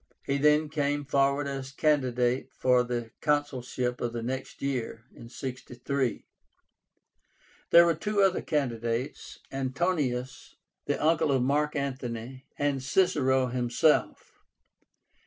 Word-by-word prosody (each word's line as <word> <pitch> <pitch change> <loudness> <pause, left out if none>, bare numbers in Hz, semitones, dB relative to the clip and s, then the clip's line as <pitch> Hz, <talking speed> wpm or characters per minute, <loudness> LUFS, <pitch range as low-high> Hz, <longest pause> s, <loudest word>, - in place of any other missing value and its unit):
He 140 0 -1
then 150 +2 +4
came 145 -1 -1
forward 140 +1 +2
as 135 -1 -5
candidate 130 -4 +1
for 125 -1 +4
the 120 -2 -4
consulship 130 -4 -1
of 120 -1 -2
the 115 -1 -4
next 130 +2 -5
year 120 -4 -3 0.2
(63). 130 +1 -4 1.4
There 170 0 +8
were 170 - +3
two 205 +5 0
other 190 -1 +2
candidates, 120 -4 -2
Antonius, 135 -2 -2 0.3
the - - 0
uncle 160 -1 +2
of 130 -2 +2
Mark 150 +3 +1
Antony, 130 -2 -4
and 145 -2 0
Cicero 130 -4 +2
himself. 125 +4 +1
135 Hz, 110 wpm, -28 LUFS, 125-150 Hz, 1.4 s, There